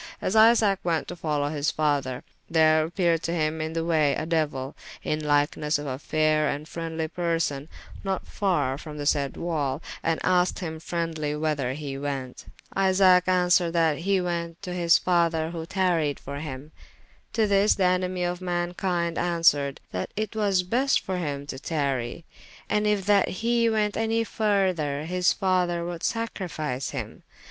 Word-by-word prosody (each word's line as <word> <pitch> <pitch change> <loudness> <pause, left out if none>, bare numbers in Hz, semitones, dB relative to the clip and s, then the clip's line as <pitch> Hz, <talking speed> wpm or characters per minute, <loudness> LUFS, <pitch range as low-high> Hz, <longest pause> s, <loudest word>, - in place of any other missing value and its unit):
As 185 - -1
Isaac 220 -3 +5
went 165 -2 0
to 175 - -5
follow 150 -4 -1
his 150 0 0
father, 140 -4 -1 0.3
there 155 -1 +4
appeared 170 -1 +1
to 165 - -2
him 155 -1 -1
in 160 +1 -3
the 165 0 -1
way 155 -4 +2
a 155 - -3
Deuyl, 150 -5 -1 0.3
in 155 0 -1
lykenesse 150 +1 +1
of 145 - -6
a 130 -1 -4
fayre 155 0 +1
and 145 +2 -3
freendly 165 -1 -4
person, 165 -4 -2 0.3
not 195 -1 -2
farre 150 -10 0
from 150 -1 -8
the 145 - -4
sayde 140 -2 +1
wall, 150 -5 -1 0.2
and 165 -1 0
asked 180 0 +2
hym 160 -4 -5
freendlye 160 -3 -3
whyther 145 -5 -1
he 140 -1 -5
went. 135 -3 -5 0.3
Isaac 190 -1 +5
answered 180 -2 +3
that 165 -3 +2
he 195 +3 +1
went 170 -2 -3
to 180 -2 -4
his 170 -2 +4
[p.352] - - -11
father 170 -3 +2
who 165 -1 -6
tarryed 170 -7 +1
for 140 +1 -6
him. 145 0 -7 0.6
To 225 - +2
this 200 +1 +4
the 195 - 0
enemie 180 0 +1
of 175 0 -2
mankynde 175 -1 -1
answered, 165 -5 +2
that 90 0 -3
it 215 +1 -3
was 200 -4 +2
best 250 +9 +2
for 190 -1 -3
hym 145 -4 -3
to 130 -2 -6
tarrye, 140 -2 -2 0.4
and 210 0 +1
yf 205 -3 +1
that 200 -2 +4
he 230 +3 +1
went 210 -2 +1
anye 225 +1 0
further, 185 -10 0
his 180 +1 +2
father 180 -3 0
would 175 -1 -5
sacrifice 165 - -3
him. - - -6
165 Hz, 170 wpm, -26 LUFS, 150-185 Hz, 0.6 s, Isaac